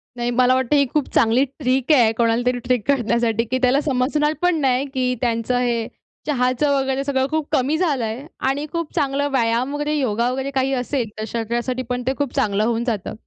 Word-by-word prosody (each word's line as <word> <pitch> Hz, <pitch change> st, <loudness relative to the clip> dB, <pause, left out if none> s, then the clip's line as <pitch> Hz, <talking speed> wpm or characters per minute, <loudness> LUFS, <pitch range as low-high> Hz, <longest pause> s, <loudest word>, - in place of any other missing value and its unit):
नाही 240 Hz, 0 st, -2 dB
मला 255 Hz, +1 st, +3 dB
वाटतं, 260 Hz, +2 st, +1 dB
ही 280 Hz, -1 st, +4 dB
खूप 300 Hz, -3 st, +1 dB
चांगली 230 Hz, +4 st, +4 dB, 0.2 s
ट्रिक 260 Hz, +1 st, +1 dB
आहे 240 Hz, -7 st, +5 dB
कोणालातरी 240 Hz, +2 st, +1 dB
ट्रिक 250 Hz, -2 st, +1 dB
करण्यासाठी 235 Hz, -4 st, +1 dB
की 260 Hz, -, +2 dB
त्याला 260 Hz, +3 st, +3 dB
समजणार 295 Hz, +3 st, +1 dB
पण 355 Hz, -1 st, +3 dB
नाही, 265 Hz, 0 st, +2 dB
की 255 Hz, -2 st, 0 dB
त्यांचं 235 Hz, 0 st, 0 dB
हे 235 Hz, -2 st, 0 dB, 0.4 s
चहाचं 255 Hz, +1 st, +1 dB
वगैरे 265 Hz, 0 st, -1 dB
सगळं 265 Hz, -1 st, 0 dB
खूप 310 Hz, -1 st, -1 dB
कमी 290 Hz, +1 st, +1 dB
झाल 310 Hz, -7 st, 0 dB
आहे 225 Hz, +5 st, -4 dB, 0.2 s
आणि 280 Hz, +2 st, -1 dB
खूप 335 Hz, -2 st, -4 dB
चांगलं 285 Hz, -2 st, 0 dB
व्यायाम 245 Hz, +1 st, +1 dB
वगैरे, 295 Hz, +1 st, -1 dB
योगा 235 Hz, -3 st, 0 dB
वगैरे 265 Hz, +2 st, -3 dB
काही 270 Hz, 0 st, 0 dB
असेल, 250 Hz, -2 st, -2 dB
तर 215 Hz, -, -2 dB
शरीरासाठी 235 Hz, +3 st, -2 dB
पण 250 Hz, 0 st, -2 dB
ते 265 Hz, -, +2 dB
खूप 285 Hz, -3 st, -2 dB
चांगलं 205 Hz, 0 st, +1 dB
होऊन 230 Hz, +1 st, 0 dB
जातं. 215 Hz, -6 st, -3 dB
255 Hz, 195 wpm, -21 LUFS, 235-280 Hz, 0.4 s, आहे